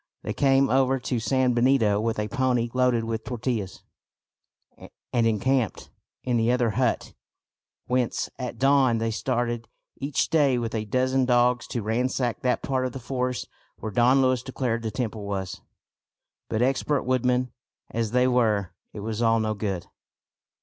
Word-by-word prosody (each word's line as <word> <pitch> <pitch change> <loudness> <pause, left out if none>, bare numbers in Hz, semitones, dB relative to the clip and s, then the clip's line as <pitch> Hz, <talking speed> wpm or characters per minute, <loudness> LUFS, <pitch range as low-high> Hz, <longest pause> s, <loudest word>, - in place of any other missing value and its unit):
They - - -3
came 135 -1 +3
over 130 0 +2
to 125 -1 -2
San 130 +2 +1
Benito 120 -4 +3
with 115 0 -1
a 105 0 -1
pony 125 -2 0
loaded 125 -2 +2
with 115 0 -3
tortillas, 115 -6 -3 1.3
and 115 -2 +3
encamped 120 +2 0 0.3
in 125 -2 +1
the 115 +1 +2
other 125 -2 +2
hut, 125 +5 -1 0.7
whence 125 -1 0
at 125 -2 -5
dawn 135 -2 +4
they 115 0 -1
started 120 +1 -2 0.3
each 140 0 -1
day 145 -5 +3
with 115 -1 -3
a 110 -1 -2
dozen 130 +4 +1
dogs 125 0 +2
to 120 - -3
ransack 120 +2 -1
that 125 - 0
part 130 -1 0
of 125 - -8
the 135 - -6
forest 125 0 -3 0.3
where 110 - -5
Don 125 +5 +4
Luis 130 -2 +2
declared 125 -3 -2
the 115 - -2
temple 110 -3 -4
was. 95 -2 -4 0.9
But, 110 +2 +1
expert 135 +2 +1
woodmen 125 -1 +1 0.4
as 115 -1 -1
they 125 +2 +3
were, 110 -7 +1 0.2
it 105 - -7
was 110 +1 -3
all 115 -1 +3
no 110 -1 0
good. 100 -4 -3
120 Hz, 155 wpm, -25 LUFS, 115-130 Hz, 1.3 s, dawn